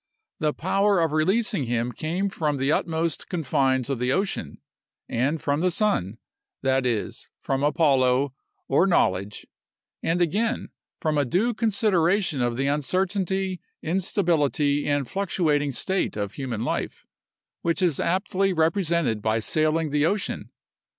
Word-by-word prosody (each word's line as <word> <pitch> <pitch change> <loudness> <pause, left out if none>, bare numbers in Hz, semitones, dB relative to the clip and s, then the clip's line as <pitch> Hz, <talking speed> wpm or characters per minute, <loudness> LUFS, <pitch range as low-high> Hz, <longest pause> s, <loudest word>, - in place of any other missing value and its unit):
The 155 -1 +1
power 195 +4 +1
of 165 -2 +1
releasing 190 - +1
him 120 0 -1
came 170 - -2
from 150 -6 -1
the 135 +2 +1
utmost 160 0 -1
confines 135 -6 +1
of 135 -3 -2
the 125 +1 +1
ocean, 195 +7 -2 0.5
and 135 +7 0
from 145 0 0
the 185 - +3
sun; 165 - 0 0.5
that 130 -1 +2
is, 115 -4 -3
from 135 0 -2
Apollo, 140 -3 +2 0.3
or 155 +8 +3
knowledge; 100 - +1 0.6
and 170 +2 0
again, 215 +8 0 0.3
from 155 -2 0
a - - +3
due 195 - +1
consideration 195 - +1
of 120 -1 0
the 135 - 0
uncertainty, 185 +6 0 0.2
instability, 160 - +1
and 145 -3 0
fluctuating 160 -7 0
state 190 - -1
of 100 -1 -3
human 125 -5 -4
life, - - -3 0.6
which 170 +1 0
is 170 -6 +2
aptly 190 +2 +1
represented 165 - +1
by 110 +1 +1
sailing 155 +6 0
the 150 +1 +3
ocean. 200 +3 -2
155 Hz, 135 wpm, -25 LUFS, 135-185 Hz, 0.6 s, the